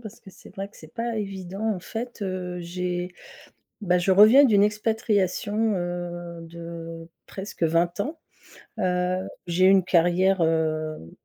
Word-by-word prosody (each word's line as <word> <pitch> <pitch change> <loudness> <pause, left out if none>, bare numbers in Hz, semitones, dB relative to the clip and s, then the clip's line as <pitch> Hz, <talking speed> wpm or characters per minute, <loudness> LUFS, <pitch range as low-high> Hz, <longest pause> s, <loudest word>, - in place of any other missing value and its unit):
parce 220 -1 -11
que 195 - -14
c'est 185 - -16
vrai 195 -1 -5
que 205 - -21
c'est - - -14
pas 235 -1 -2
évident. 195 +1 -3
En 180 - -7
fait, 230 +4 -6
heu, 185 -2 -4
j'ai 180 +1 -3 0.7
bah, 180 -4 +2
je 180 +2 +1
reviens 215 +9 +8
d'une 210 -7 +5
expatriation, 210 0 0
heu, 175 -1 -4
de 165 0 -8 0.2
presque 190 -2 -6
20 170 +2 +2
ans. 310 +9 -5 0.6
Heu, 180 0 0 0.2
j'ai 175 +2 +2
eu - - +7
une 195 -2 +5
carrière, 180 +2 +3
hem, 155 - 0
185 Hz, 150 wpm, -25 LUFS, 175-205 Hz, 0.7 s, reviens